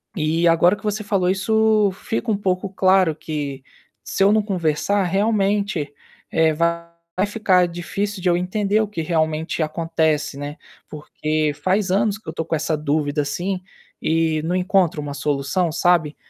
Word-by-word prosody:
E 165 0 0
agora 170 +3 +4
que - - -17
você 215 0 -1
falou 195 -3 +1
isso, 215 +2 +3
fica 225 +4 -4
um - - +2
pouco 190 -1 -1
claro 185 -3 +3
que, 145 -4 -5 0.4
se - - -4
eu 195 - +6
não 215 0 +4
conversar 190 0 0
realmente, 200 -3 0 0.4
eh, 160 0 +3
vai 170 +2 -2
ficar 205 -4 +2
difícil 190 +4 -4
de 185 - -1
eu 175 - +3
entender 200 +3 0
o 215 - -1
que 205 -6 -4
realmente 160 0 -1
acontece, 155 -2 -1
né, 145 +2 -6 0.3
porque 155 0 -2
faz 190 +1 +1
anos 205 +2 +1
que 220 - -25
eu - - -3
estou 165 - -4
com - - -1
essa 155 0 -1
dúvida, 150 0 0
assim, 180 +6 -3 0.4
e 160 -1 +1
não 165 +2 -1
encontro 185 -4 +1
uma 145 -1 -5
solução, 145 +4 -1
sabe? 165 -2 +2
175 Hz, 160 wpm, -21 LUFS, 155-195 Hz, 0.4 s, eu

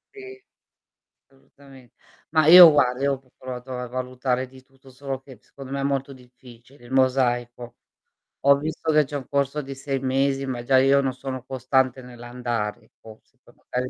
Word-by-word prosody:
Sì. 395 0 -12 0.9
Solutame 135 -2 -20 0.4
mah, 155 -1 +2
io 175 -1 +11
guarda, 125 -3 +1
io 140 0 +2
ho 135 - -4
p 135 - -30
provato 130 0 -7
a 125 - -5
valutare 130 +1 -3
di 130 0 -16
tutto, 135 0 -21
solo 135 0 -6
che, 135 -2 -15
secondo 135 -1 -13
me, 140 0 -3
è - - -3
molto 140 0 -2
difficile, 125 0 -18
il 120 - -15
mosaico. 120 -2 0 0.7
Ho 140 0 +6
visto 155 +2 -3
che 150 -1 +3
c'è 145 - -8
un 135 -3 -6
corso 140 +1 -1
di 135 -1 -8
6 135 0 -4
mesi 135 +1 0
ma 130 -2 -4
già 130 +2 +3
io 135 +1 +4
non 135 -1 -1
sono 130 -1 -7
costante 130 0 0
nell'andare, 120 -3 -6
forse, 110 0 -17
poi - - -22
magari 125 0 -5
130 Hz, 175 wpm, -23 LUFS, 125-140 Hz, 0.9 s, io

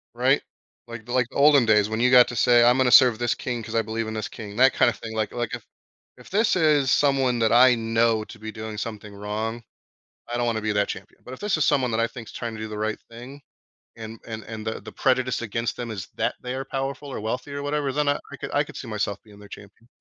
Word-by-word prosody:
Right, - - +2 0.5
like 115 -2 -9
the, 120 - -9
like 125 -1 +2
olden 140 -3 +5
days 105 -1 +3
when 110 0 -2
you 125 +1 +4
got 125 -1 +7
to 120 - -6
say, 120 +2 +5
"I'm 120 +1 +5
gonna 130 -1 +3
serve 125 -3 +7
this 120 -1 0
king 120 -2 -4
'cause 110 +1 -7
I 115 - +3
believe 110 +1 -4
in 110 - -5
this 110 -1 -4
king." 105 -2 -9
that, 130 +3 +5
kinda, 120 - +3
thing, 110 -1 -8
like, 110 -2 -2
like 120 -1 -3
if, - - -6 0.5
if - - -16
this 210 +2 +2
is 150 -5 +3
someone 135 -3 +2
that 110 -1 +2
I 125 +1 +6
know 115 -1 +1
to 115 - -13
be 110 +1 -7
doing 110 0 -7
something 105 -1 -6
wrong, 105 +3 -4 0.7
I 120 - -2
don't 120 - 0
wanna 115 -2 -1
be 110 0 -1
their 105 -1 +1
champion, - - -9
but 125 - -8
if - - -11
this 205 -4 0
is 155 - +2
someone 130 -4 +2
that 110 - 0
I 115 - +2
think 115 -1 -10
is - - -10
trying 115 -1 -5
to 110 - -8
do 110 - -5
the 105 - -6
right 110 +1 -2
thing, 125 +5 -11 0.6
and, 110 0 -9
and, 110 -1 -6
and 110 0 -8
the, 110 - -3
the - - -10
prejudice 130 -1 0
against 115 +1 -3
them 120 -2 -5
is 95 -5 -7
that - - 0
they 125 0 -4
are 135 - -4
powerful 135 +1 -4
or - - -5
wealthy 125 +6 -4
or 140 - -4
whatever, 145 -1 -1
then 145 +1 0
I, 145 - +2
I - - -7
could, - - -7
I 145 - +2
could - - -12
see 120 - -7
myself 100 -1 -3
being 105 -2 -17
their 105 - -14
champion. 105 +3 -14
115 Hz, 265 wpm, -24 LUFS, 110-130 Hz, 0.7 s, got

